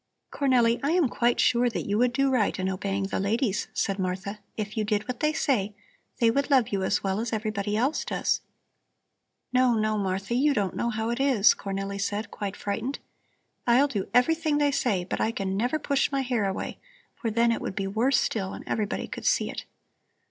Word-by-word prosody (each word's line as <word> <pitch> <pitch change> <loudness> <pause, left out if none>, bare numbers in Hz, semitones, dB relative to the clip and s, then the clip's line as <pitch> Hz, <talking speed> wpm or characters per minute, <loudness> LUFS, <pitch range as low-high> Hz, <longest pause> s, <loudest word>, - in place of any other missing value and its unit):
"Cornelli, 245 -4 +3
I 285 +4 +1
am 350 -5 +3
quite 240 0 +1
sure 245 0 +3
that 230 - -4
you 205 - -1
would 245 0 +3
do 275 +2 +1
right 240 -6 +1
in 185 -1 -1
obeying 195 +1 -2
the 195 - -2
ladies," 205 +1 0
said 195 0 -1
Martha. 190 +3 -3 0.2
"If 215 0 -4
you 220 - 0
did 210 +1 -1
what 250 -2 -4
they 305 - +2
say, 215 -9 0 0.4
they 230 -1 +4
would 280 +5 0
love 260 -6 +4
you 195 -1 -1
as 190 - 0
well 195 +1 0
as 230 +1 -3
everybody 210 -2 -2
else 265 +7 +1
does." - - 0 1.1
"No, 250 -1 +4
no, 215 -1 +1
Martha, 195 +2 -2
you 280 +4 +3
don't 200 -4 -1
know 235 - 0
how 220 0 -2
it 235 - -2
is," 260 -7 +5
Cornelli 195 0 -4
said, 205 +1 -2
quite 200 -1 -4
frightened. 225 +7 -3 0.7
"I'll 250 +4 +5
do 205 -9 -3
everything 310 +4 +2
they 290 -1 +3
say, 210 -9 0
but 175 - -3
I - - +2
can 195 -3 -3
never 245 +9 0
push 280 -1 0
my 275 -1 +1
hair 245 -5 0
away, 190 - -5 0.3
for 230 - -3
then 230 +2 +3
it 230 - -1
would - - -4
be 195 - -2
worse 230 +7 +2
still 195 -4 -2
and - - -9
everybody 210 -3 -2
could - - -5
see - - +2
it." - - -7
225 Hz, 205 wpm, -27 LUFS, 200-255 Hz, 1.1 s, is